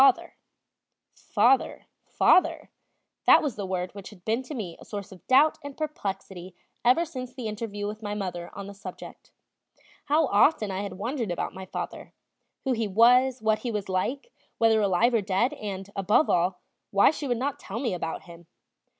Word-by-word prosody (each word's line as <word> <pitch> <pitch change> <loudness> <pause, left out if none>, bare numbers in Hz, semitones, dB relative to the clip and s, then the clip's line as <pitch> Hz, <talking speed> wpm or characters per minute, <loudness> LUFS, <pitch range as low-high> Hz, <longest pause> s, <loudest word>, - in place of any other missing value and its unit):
"Father, 270 -2 +4 1.7
father," 330 -2 +3 0.6
that - - +8
was 285 -6 -2
the 200 -2 -4
word 180 -1 -3
which 200 -2 -9
had 190 -4 -17
been 225 +3 +1
to 275 +3 -8
me 185 -8 -5
a - - -12
source 205 -1 -7
of 185 - -15
doubt 280 +4 +5
and 285 -1 -8
perplexity 195 - -5 0.3
ever 255 +8 +4
since 255 -5 -7
the 250 -3 -6
interview 210 -1 -4
with 210 +1 -5
my 205 -1 -4
mother 180 -4 -4
on 200 0 -6
the 200 - -8
subject. 200 - -10 0.8
How 305 +2 +3
often 210 -2 +3
I 190 +1 -2
had 200 -2 -5
wondered 235 +3 -3
about 175 - -3
my 190 0 -8
father, - - -6 0.5
who 265 - 0
he 225 -3 0
was, 245 +4 +4
what 220 0 +2
he 245 - -4
was 210 -3 -3
like, 250 - -2 0.3
whether 225 -1 +4
alive 205 +5 +3
or 230 - +3
dead, 200 +7 +1
and, 200 -8 -6
above 200 +9 +3
all, 180 +1 +1 0.3
why 200 +6 +5
she 300 -2 -5
would 245 -2 0
not 280 +3 -2
tell 230 - -6
me 240 -6 -1
about 165 -2 -4
him. 170 -1 -14
215 Hz, 180 wpm, -27 LUFS, 190-255 Hz, 1.7 s, that